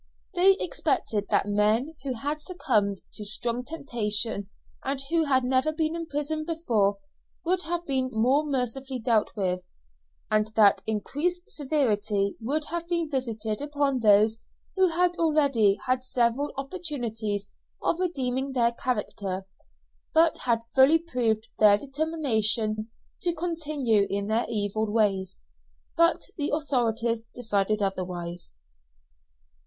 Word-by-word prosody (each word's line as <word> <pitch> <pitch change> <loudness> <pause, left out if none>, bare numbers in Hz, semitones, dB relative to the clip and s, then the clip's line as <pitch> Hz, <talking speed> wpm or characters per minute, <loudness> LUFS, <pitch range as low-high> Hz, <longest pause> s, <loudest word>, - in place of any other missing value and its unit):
They 380 +2 +6
expected 240 - -1
that - - +2
men 215 +8 +2
who 265 -2 -3
had 290 +6 -3
succumbed 215 - 0
to 210 - -3
strong 235 +4 -1
temptation 225 -8 -1 0.3
and 270 0 -2
who 330 -1 +3
had 260 -3 +2
never 260 +4 +2
been 315 +1 -1
in 335 -1 -5
prison 300 +1 -2
before 245 -12 0 0.5
would 360 +2 +1
have 345 +1 -3
been 260 -3 0
more 255 +6 +2
mercifully 265 -1 -2
dealt 225 -3 +1
with; 180 -2 -1 0.7
and 215 0 +3
that 205 -3 +5
increased 295 - -2
severity 215 -9 0
would 295 +7 -1
have 340 0 -3
been 340 -3 -1
visited 225 -4 -2
upon 285 -2 0
those 215 0 +4 0.4
who 380 -1 +4
had 350 +1 +2
already 280 -11 +3
had 255 0 0
several 255 +3 +1
opportunities 240 - -3 0.4
of 335 - +1
redeeming 270 -6 -1
their 235 -2 +3
character, 205 -6 -3 0.7
but 325 0 +5
had 230 -2 0
fully 270 +4 +6
proved 240 -9 -1
their 210 -1 +7
determination 230 -7 +1 0.3
to 345 -3 +2
continue 300 - 0
in 200 0 -1
their 220 +3 0
evil 210 0 -1
ways; 200 -4 +1 0.6
but 335 -1 +3
the 290 -2 0
authorities 235 -6 0
decided 215 -3 0
otherwise. 180 - -4
250 Hz, 125 wpm, -27 LUFS, 215-300 Hz, 0.7 s, their